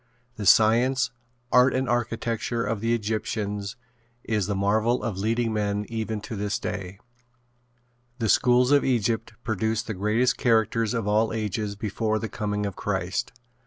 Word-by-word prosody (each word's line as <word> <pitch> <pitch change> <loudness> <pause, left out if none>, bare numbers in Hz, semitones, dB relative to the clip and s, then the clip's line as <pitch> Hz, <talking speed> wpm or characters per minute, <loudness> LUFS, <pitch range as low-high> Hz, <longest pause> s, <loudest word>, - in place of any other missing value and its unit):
The 105 -2 -3
science, 115 +4 +4 0.4
art 125 +1 +5
and 130 0 0
architecture 115 0 -1
of 105 0 -2
the 115 +1 +2
Egyptians 105 -1 -3 0.5
is 105 -4 -1
the 100 - -1
marvel 110 +4 +1
of 105 -4 -3
leading 115 +2 0
men 105 -1 -1
even 110 -2 -3
to 110 - -6
this 105 0 -1
day. 95 0 -5 1.2
The 115 -3 -1
schools 125 +4 +4
of 145 -1 +5
Egypt 115 -2 0
produced 110 +1 -1
the 110 - -4
greatest 105 +6 +1
characters 115 0 +2
of 115 -3 -2
all 105 +2 +2
ages 105 -1 -2
before 110 +1 -1
the 110 0 -4
coming 105 -1 -2
of 100 -3 -4
Christ. 95 -2 -2
110 Hz, 150 wpm, -25 LUFS, 105-115 Hz, 1.2 s, art